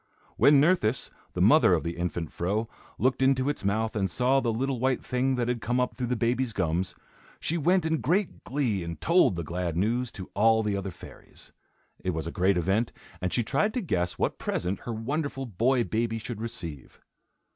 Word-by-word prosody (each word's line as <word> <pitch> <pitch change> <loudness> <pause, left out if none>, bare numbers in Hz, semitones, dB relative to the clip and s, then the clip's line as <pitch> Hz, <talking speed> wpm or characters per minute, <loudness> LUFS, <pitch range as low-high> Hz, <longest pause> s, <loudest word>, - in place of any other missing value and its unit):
When 145 -1 +6
Nerthus, 140 -7 +2 0.2
the - - +1
mother - - +6
of - - -2
the 85 +1 -3
infant 85 -2 -3
Fro, 105 +6 -1 0.3
looked 130 +1 +1
into 135 0 +3
its 145 - -3
mouth 110 +3 0
and 95 -3 0
saw 130 +7 +2
the 120 -3 0
little 130 +3 -1
white 130 0 0
thing 130 +1 +1
that 120 -2 -1
had 120 -2 -1
come 125 +4 0
up 125 - 0
through 125 -2 -2
the 125 - 0
baby's 120 +1 0
gums, 90 -1 -1 0.4
she 165 - -1
went 175 +2 +2
in 160 -1 0
great 180 +6 0
glee 125 -9 -1
and 85 -2 -6
told 170 - +4
the 85 - -3
glad 85 +1 -3
news 115 +6 0
to 95 -3 -9
all 110 +2 +4
the 105 -1 0
other 100 0 -3
fairies. 85 - -13 0.5
It 90 -3 -1
was 80 - -3
a 85 - -4
great 95 +1 +2
event 95 +7 +1 0.3
and 90 0 -1
she 120 - +1
tried 160 - 0
to 250 - 0
guess 90 - -1
what - - -1
present 90 +2 -2
her 120 - -6
wonderful 135 +4 -3
boy 120 +4 +1
baby 115 0 -1
should 110 0 -6
receive. 85 - -7
115 Hz, 200 wpm, -27 LUFS, 95-130 Hz, 0.5 s, When